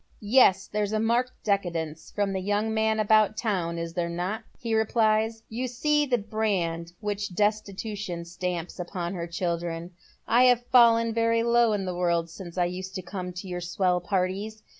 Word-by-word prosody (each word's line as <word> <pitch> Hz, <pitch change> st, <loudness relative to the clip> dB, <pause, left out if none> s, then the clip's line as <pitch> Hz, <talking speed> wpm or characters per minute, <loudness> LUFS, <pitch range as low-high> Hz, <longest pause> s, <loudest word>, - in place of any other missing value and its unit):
" -, -, -33 dB, 0.2 s
Yes, 195 Hz, -5 st, +5 dB
there's 210 Hz, 0 st, -2 dB
a 215 Hz, -, +1 dB
marked 235 Hz, +3 st, +1 dB
decadence 165 Hz, -6 st, -2 dB
from 205 Hz, -1 st, -1 dB
the 190 Hz, -, -2 dB
young 205 Hz, +3 st, 0 dB
man 220 Hz, 0 st, +1 dB
about 215 Hz, 0 st, +4 dB
town, 180 Hz, -7 st, -1 dB
is 165 Hz, 0 st, -4 dB
there 170 Hz, -1 st, -1 dB
not?" 180 Hz, +5 st, -3 dB, 0.2 s
he 230 Hz, -1 st, -3 dB
replies. 220 Hz, 0 st, +2 dB
"You 245 Hz, +3 st, -3 dB
see 295 Hz, +4 st, +1 dB
the 250 Hz, -2 st, +2 dB
brand 195 Hz, -6 st, -2 dB
which 205 Hz, -3 st, -3 dB
Destitution 205 Hz, -3 st, -2 dB
stamps 175 Hz, 0 st, -4 dB
upon 175 Hz, 0 st, -4 dB
her 170 Hz, -2 st, -4 dB
children. 170 Hz, 0 st, -3 dB, 0.4 s
I 245 Hz, +2 st, +5 dB
have 245 Hz, -1 st, +4 dB
fallen 230 Hz, -2 st, +5 dB
very 230 Hz, 0 st, +2 dB
low 235 Hz, -1 st, +4 dB
in 200 Hz, -2 st, -1 dB
the 180 Hz, -, -2 dB
world 170 Hz, -2 st, 0 dB
since 175 Hz, 0 st, -9 dB
I 175 Hz, -, +3 dB
used 185 Hz, +2 st, -5 dB
to 185 Hz, -, -4 dB
come 180 Hz, 0 st, -5 dB
to 180 Hz, +2 st, -7 dB
your 180 Hz, -1 st, -4 dB
swell 180 Hz, +1 st, +1 dB
parties. 195 Hz, +4 st, -2 dB
200 Hz, 180 wpm, -27 LUFS, 175-220 Hz, 0.4 s, Yes